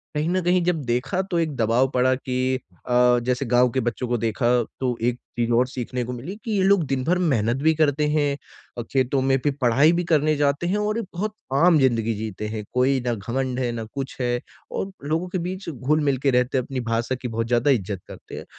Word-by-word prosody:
कहीं 150 +2 0
न 185 +1 +1
कहीं 180 +1 +3
जब 170 -3 0
देखा 125 +9 0
तो 170 - +1
एक 160 -3 -1
दबाव 120 +2 +2
पड़ा 130 0 +3
कि 130 0 -1 0.3
अ, 125 0 +4
जैसे 125 +2 0
गाँव 125 +1 +5
के 130 - 0
बच्चों 120 +1 -2
को 120 0 0
देखा 115 +1 0 0.3
तो 125 -2 -1
एक 125 - -5 0.2
चीज़ 120 0 0
और 125 - +2
सीखने 125 -1 -4
को 125 - -5
मिली 135 +11 -6
कि 225 - -4
ये 200 -3 +2
लोग 195 -2 +4
दिन 135 -2 -1
भर 180 +5 +2
मेहनत 120 +2 +1
भी 160 +1 +5
करते 150 -1 +2
हैं 145 -2 +1 0.4
और 120 - -3
खेतों 130 0 +1
में, 135 0 +3
फिर 145 -2 0
पढ़ाई 130 +6 +5
भी 175 +1 0
करने 155 0 +3
जाते 145 +3 +1
हैं 190 +4 +1
और 210 +1 0
एक 230 - -4
बहुत 210 +5 -3 0.3
आम 175 -3 +6
ज़िंदगी 115 -4 +2
जीते 105 -1 -5
हैं। 110 0 -4
कोई 130 +2 +3
न 120 - +1
घमंड 125 +5 -3
है 120 -2 0
ना 115 -1 -4
कुछ 135 -1 -5
है 120 0 0 0.3
और 195 - -3
लोगों 160 +5 -1
के 185 - -2
बीच 185 -1 -6
घुल-मिल 145 0 +1
के - - +5
रहते 125 +1 +2
हैं 130 - +1
अपनी 135 -1 -4
भाषा 115 +3 0
की 125 - -3
बहुत 115 0 -2
ज़्यादा 120 +4 +3
इज़्जत 100 -5 -1
करते - - -11
हैं। - - -8
130 Hz, 230 wpm, -23 LUFS, 120-155 Hz, 0.4 s, आम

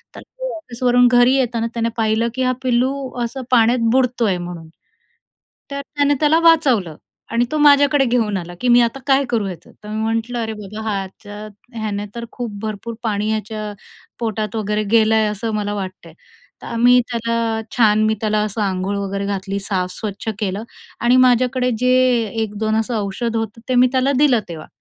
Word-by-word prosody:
तर - - -9
तो - - -7
ऑफिसवरून 245 -4 +2
घरी 245 +1 +5
येताना 235 -3 0
त्याने 230 -1 0
पाहिलं, 225 +1 +1
की 260 - 0
हा 255 - +2
पिल्लू 250 +1 +2 0.3
असं 260 +3 -4
पाण्यात 235 0 +4
बुडतोय 245 -7 +1
म्हणून, 175 -2 -7 1.0
तर 280 0 -3
त्याने 285 0 0
त्याला 310 +1 +4
वाचवलं 270 - +3 0.4
आणि 235 +1 +2
तो 310 - 0
माझ्याकडे 285 -1 +5
घेऊन 225 -5 +1
आला, 175 0 -7
की 250 - 0
“मी 240 0 +6
आता 235 +3 0
काय 275 0 +3
करू 225 -4 0
ह्याचं?” 185 -3 -8
तर 210 - -9
मी 215 +1 -3
म्हटलं, 225 +2 -1
“अरे 220 -1 -3
बाबा, 210 +2 -8
ह्याच्या 205 +1 -6 0.3
ह्याने 205 -1 -3
तर 235 - -5
खूप 240 -3 -5
भरपूर 220 +1 -5
पाणी 210 -1 -1
ह्याच्या 215 -1 -4 0.5
पोटात 220 -2 -3
वगैरे 210 0 -1
गेलं 220 0 +4
आहे, 220 -1 +3
असं 215 +2 -3
मला 205 0 -2
वाटतंय.” 185 -4 -7 0.5
तर - - -9
आम्ही 245 +2 +4
त्याला 230 -1 -1 0.2
छान, 215 -2 +4
मी 220 - +2
त्याला 215 -1 +1
असं 215 +1 -3
अंघोळ 195 0 -1
वगैरे 200 0 -3
घातली, 200 0 -3
साफ 190 -2 -2
स्वच्छ 210 +2 -5
केलं. 205 0 -2 0.4
आणि 240 +1 +4
माझ्याकडे 250 0 +3
जे 250 - +2 0.5
1-2 215 +1 -2
असं 230 +1 -2
औषध 225 +4 -3
होतं, 225 0 -4
ते 255 - +2
मी 250 +1 +6
त्याला 265 +1 +2
दिलं 275 -5 +4
तेव्हा. 160 -2 -8
225 Hz, 175 wpm, -19 LUFS, 205-250 Hz, 1.0 s, मी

